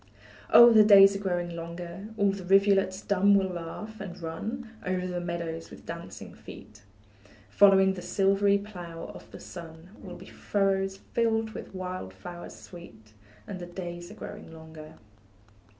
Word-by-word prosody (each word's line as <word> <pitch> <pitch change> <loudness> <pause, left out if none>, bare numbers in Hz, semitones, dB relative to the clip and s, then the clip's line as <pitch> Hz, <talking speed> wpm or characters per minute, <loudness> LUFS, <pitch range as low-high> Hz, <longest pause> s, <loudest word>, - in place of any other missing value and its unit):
Oh, 235 0 +9
the 215 -1 +8
days 200 -1 +8
are - - -3
growing 175 -3 -2
longer, 170 +3 -7
All 200 -1 +3
the 195 -1 -7
rivulets 195 0 +3
dumb 200 +1 +3
will 195 -1 +3
laugh, 185 +5 -7
and 195 -3 -8
run 220 +9 -6
Over 185 0 -2
the 180 -1 -3
meadows 170 -1 -5
with - - -13
dancing - - -8
feet; 105 +1 -13 0.7
Following 190 - +5
the 185 - -7
silvery 200 +2 +2
plough 175 -5 -8
of - - -13
the - - -11
sun, 165 0 -11
Will 180 -2 -9
be 185 - -12
furrows 195 -1 -1 0.2
filled 225 -1 +1
with 205 - -9
wild 185 - -6
flowers 175 - -9
sweet: 110 -12 -14 0.3
And 185 - -7
the 175 - -7
days 175 -1 -7
are - - -11
growing - - -9
longer. 160 -1 -12
185 Hz, 155 wpm, -28 LUFS, 170-200 Hz, 0.7 s, Oh